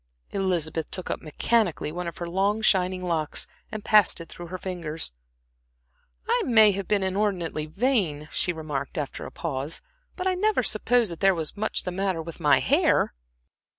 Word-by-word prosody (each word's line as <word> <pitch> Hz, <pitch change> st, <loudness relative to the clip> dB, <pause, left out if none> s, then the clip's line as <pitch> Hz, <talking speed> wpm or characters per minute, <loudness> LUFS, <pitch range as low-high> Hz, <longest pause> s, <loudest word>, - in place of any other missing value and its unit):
Elizabeth 170 Hz, -5 st, -1 dB
took 185 Hz, -, -3 dB
up -, -, -3 dB
mechanically 175 Hz, +1 st, 0 dB
one 175 Hz, +2 st, -4 dB
of 170 Hz, -, -6 dB
her 175 Hz, -, -4 dB
long 195 Hz, +5 st, +1 dB
shining 185 Hz, -2 st, +2 dB
locks 160 Hz, -4 st, -1 dB, 0.3 s
and 215 Hz, -2 st, -6 dB
passed 210 Hz, -4 st, +5 dB
it 165 Hz, -, -9 dB
through 175 Hz, -, -9 dB
her 185 Hz, +2 st, -5 dB
fingers. 170 Hz, -, -5 dB, 1.2 s
"I -, -, +2 dB
may 220 Hz, -4 st, +6 dB
have 195 Hz, -1 st, -4 dB
been 205 Hz, -2 st, +2 dB
inordinately 190 Hz, -5 st, -1 dB
vain," 185 Hz, -, 0 dB
she 180 Hz, -, 0 dB
remarked 150 Hz, -4 st, -4 dB
after 145 Hz, -3 st, -4 dB
a -, -, -10 dB
pause, 145 Hz, -2 st, -4 dB, 0.4 s
"but 365 Hz, -, -4 dB
I 375 Hz, -, +3 dB
never 400 Hz, -5 st, +2 dB
supposed 230 Hz, +2 st, +2 dB
before -, -, -2 dB
that 165 Hz, -, -10 dB
there 195 Hz, -1 st, +4 dB
was 160 Hz, -2 st, -3 dB
much 215 Hz, +1 st, -1 dB
the 180 Hz, -, -3 dB
matter 190 Hz, -1 st, -1 dB
with 165 Hz, 0 st, -9 dB
my 145 Hz, -2 st, +5 dB
hair." -, -, +3 dB
180 Hz, 180 wpm, -26 LUFS, 160-205 Hz, 1.2 s, may